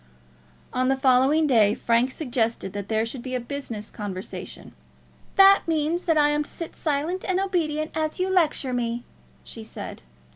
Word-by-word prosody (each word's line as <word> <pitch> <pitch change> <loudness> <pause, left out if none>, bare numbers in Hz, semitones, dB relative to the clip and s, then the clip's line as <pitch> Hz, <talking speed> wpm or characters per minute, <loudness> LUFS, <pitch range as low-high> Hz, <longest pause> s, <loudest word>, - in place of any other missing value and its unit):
On 255 0 +1
the 270 0 +2
following 265 +4 +4
day 220 -6 +4
Frank 235 +2 +2
suggested 240 - -2
that 205 0 -5
there 220 0 +1
should 235 +2 -5
be 255 +1 -4
a - - 0
business 240 -4 -6
conversation. 195 -2 -7 0.6
"That 390 0 +8
means 325 +2 0
that 325 -3 +2
I 295 -1 +5
am 295 0 +1
to 295 - -6
sit 335 - -7
silent 315 +5 -1
and 375 -1 0
obedient 315 -6 -1
while 315 -1 +1
you 370 0 -1
lecture 310 -7 +2
me," 240 -1 -2 0.4
she 225 - -9
said. 220 - -8
275 Hz, 170 wpm, -25 LUFS, 235-315 Hz, 0.6 s, That